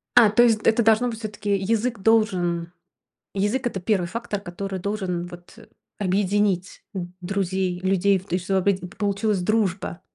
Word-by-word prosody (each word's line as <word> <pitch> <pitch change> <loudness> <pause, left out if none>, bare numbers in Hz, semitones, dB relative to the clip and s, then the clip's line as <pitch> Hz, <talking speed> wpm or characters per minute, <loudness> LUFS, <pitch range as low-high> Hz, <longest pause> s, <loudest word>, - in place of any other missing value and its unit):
А, 230 -3 +8
то 220 +4 +5
есть 225 -3 +4
это 225 +1 +3
должно 225 +2 +4
быть 225 -2 -6
всё-таки 210 -2 -2
язык 225 +4 0
должен 180 -6 +1 0.7
язык- 210 +7 0
это 200 -5 -2
1 185 -1 +1
фактор, 210 +1 -4
который 195 +1 -5
должен, 185 -3 -3
вот, 175 +4 -13 0.4
объединить 195 -1 0
д 185 -3 -4
друзей, 190 -1 -1
людей 195 +1 +2
и - - 0
в 185 - -13
т 180 - 0
что 190 +1 0
опять 190 0 +1
п 180 - -6
получилась 200 +1 -1
дружба. 190 -3 0
195 Hz, 165 wpm, -24 LUFS, 180-215 Hz, 0.7 s, А